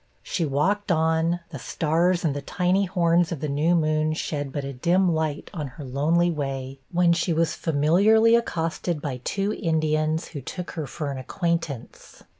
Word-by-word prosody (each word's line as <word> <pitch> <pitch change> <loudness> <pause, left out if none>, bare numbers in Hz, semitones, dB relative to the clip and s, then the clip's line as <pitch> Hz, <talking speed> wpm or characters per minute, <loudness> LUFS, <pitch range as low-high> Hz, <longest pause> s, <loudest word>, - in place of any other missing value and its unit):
She 170 - -1
walked 190 +9 0
on, 160 +1 +1
the 145 - -6
stars 170 +7 +1
and 145 -3 +1
the 145 - -3
tiny 180 +6 +1
horns 175 -2 +2
of 165 - -3
the 150 - -2
new 150 +5 +2
moon 155 -1 +1
shed 145 -3 -3
but 145 0 -3
a 140 0 -5
dim 175 +7 +2
light 155 -2 -2
on 155 -6 -4
her 150 - -7
lonely 160 +7 +2
way, 135 -3 -4
when 175 -1 +4
she 170 0 0
was 160 0 +1
familiarly 195 +10 +4
accosted 170 -6 -1
by 135 -4 -5
two 200 +7 -1
Indians, 155 -2 0
who 145 - -7
took 180 +7 -6
her 155 -4 -4
for 145 +1 -4
an 135 - -5
acquaintance. 165 - -4
160 Hz, 175 wpm, -25 LUFS, 145-175 Hz, -, when